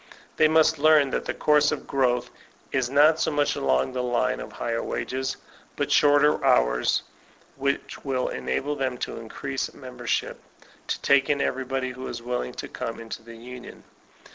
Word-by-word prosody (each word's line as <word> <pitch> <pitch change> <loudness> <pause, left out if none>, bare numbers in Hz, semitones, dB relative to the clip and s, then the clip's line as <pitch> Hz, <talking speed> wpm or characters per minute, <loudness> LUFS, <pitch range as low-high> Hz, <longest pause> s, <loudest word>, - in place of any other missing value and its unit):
They 155 - +6
must 160 0 +4
learn 150 -2 +5
that - - -2
the - - -2
course 150 -1 +3
of - - -4
growth 125 -3 0 0.4
is 130 -3 0
not 150 +4 +5
so - - +1
much 145 -1 +1
along 65 - +1
the 125 - -1
line 125 +1 0
of - - -7
higher 115 -1 -2
wages, 130 +1 -3 0.4
but - - -2
shorter 145 0 +4
hours, - - +3 0.5
which 140 +1 -2
will 130 -2 -1
enable 65 - -2
them 130 -3 -2
to - - -4
increase 135 +4 -4
membership, 125 -3 -3 0.5
to - - -2
take 140 -1 +4
in 145 -1 +2
every 130 -1 -1
body 130 0 -2
who 130 +1 -7
is 120 - -5
willing 120 - -3
to - - -6
come 115 - -5
into 115 0 -7
the 115 0 -12
union. 125 +1 -10
130 Hz, 170 wpm, -25 LUFS, 120-145 Hz, 0.5 s, They